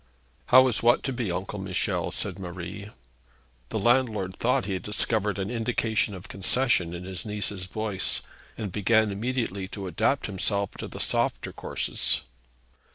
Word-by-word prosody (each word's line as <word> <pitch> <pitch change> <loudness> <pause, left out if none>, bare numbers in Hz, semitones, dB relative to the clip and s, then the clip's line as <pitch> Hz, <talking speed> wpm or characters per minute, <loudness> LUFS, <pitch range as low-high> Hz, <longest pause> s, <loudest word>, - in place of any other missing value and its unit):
'How 130 +1 +8
is 125 - +1
what 120 +1 +5
to 135 - -1
be, 120 -6 -1
Uncle 95 +3 -3
Michel?' 95 -1 0
said - - -3
Marie. 90 +3 -6 0.8
The - - -2
landlord 110 -5 +2
thought 125 -3 +2
that 100 - -5
he 95 - 0
discovered 105 +1 0
an 95 +2 -2
indication 110 -3 0
of 95 - -9
concession 95 -3 +1
in 85 - -6
his 90 -2 -5
niece's 105 -3 -2
voice, 105 0 -2 0.3
and 105 -4 -3
began 110 +3 +3
immediately 105 -3 -2
to 100 -1 -6
adapt 95 - +1
himself 100 0 0
to - - -4
the - - -8
softer - - 0
courses. - - -1
105 Hz, 155 wpm, -27 LUFS, 95-115 Hz, 0.8 s, How